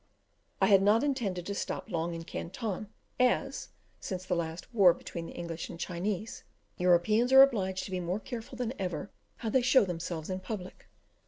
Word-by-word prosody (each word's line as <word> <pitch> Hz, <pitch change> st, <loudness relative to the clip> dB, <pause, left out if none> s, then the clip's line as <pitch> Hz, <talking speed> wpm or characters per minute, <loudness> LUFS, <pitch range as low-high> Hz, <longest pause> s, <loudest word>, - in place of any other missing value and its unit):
I -, -, +4 dB
had 195 Hz, -2 st, +6 dB
not 210 Hz, +5 st, +4 dB
intended 215 Hz, -11 st, -1 dB
to 200 Hz, -, -3 dB
stop 200 Hz, -, -4 dB
long 170 Hz, -3 st, -2 dB
in 165 Hz, -, -6 dB
Canton, 205 Hz, +5 st, -4 dB, 0.3 s
as, 270 Hz, +2 st, +1 dB, 0.3 s
since 185 Hz, -1 st, -5 dB
the 180 Hz, -, 0 dB
last 170 Hz, +5 st, -4 dB
war 190 Hz, -6 st, +6 dB
between 170 Hz, -1 st, -7 dB
the -, -, -9 dB
English 170 Hz, -1 st, -5 dB
and 170 Hz, -, -8 dB
Chinese, 190 Hz, +4 st, -3 dB, 0.3 s
Europeans 180 Hz, +7 st, +3 dB
are 265 Hz, 0 st, +11 dB
obliged 190 Hz, -8 st, 0 dB
to -, -, -7 dB
be 185 Hz, -, -1 dB
more 180 Hz, +3 st, -2 dB
careful 240 Hz, +1 st, -7 dB
than 245 Hz, -1 st, -2 dB
ever 185 Hz, +1 st, -3 dB, 0.3 s
how 225 Hz, -, -3 dB
they 260 Hz, -, +4 dB
show 255 Hz, -2 st, +5 dB
themselves 170 Hz, -1 st, -4 dB
in 185 Hz, -, -2 dB
public. 185 Hz, -1 st, -7 dB
190 Hz, 180 wpm, -30 LUFS, 175-230 Hz, 0.3 s, are